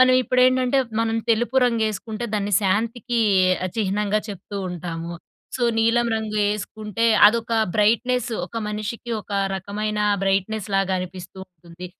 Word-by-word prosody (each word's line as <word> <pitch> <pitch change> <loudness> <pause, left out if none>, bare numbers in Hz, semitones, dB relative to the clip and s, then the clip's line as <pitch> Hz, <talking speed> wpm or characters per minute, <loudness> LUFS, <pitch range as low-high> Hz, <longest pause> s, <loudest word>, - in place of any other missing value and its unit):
మనవిప్పుడేంటంటే, 255 +1 +4 0.2
మనం 225 0 -1
తెలుపు 240 +3 +1
రంగేసుకుంటే, 220 0 -2
దాన్ని 205 0 -1
శాంతికీ 230 +4 0 0.5
ఆహ్, 180 - -8
చిహ్నంగా 210 +1 0
చెప్తూ 200 +1 -7
ఉంటాము. 170 -1 -5 0.4
సో, 245 - 0
నీలం 235 +1 +3
రంగు 220 -1 -4 0.2
ఏసుకుంటే, 210 +1 -4 0.2
అదొకా 230 +1 +1 0.2
బ్రైట్‌నెస్సు. 235 +3 +1
ఒక 230 - -10
మనిషికి 215 +3 -5
ఒక 205 - -11 0.2
రకమైన 210 +3 -3 0.2
బ్రైట్‌నెస్‌లాగనిపిస్తూ 195 -2 -1
ఉంటుంది. 175 0 -12
215 Hz, 110 wpm, -22 LUFS, 195-235 Hz, 0.5 s, మనవిప్పుడేంటంటే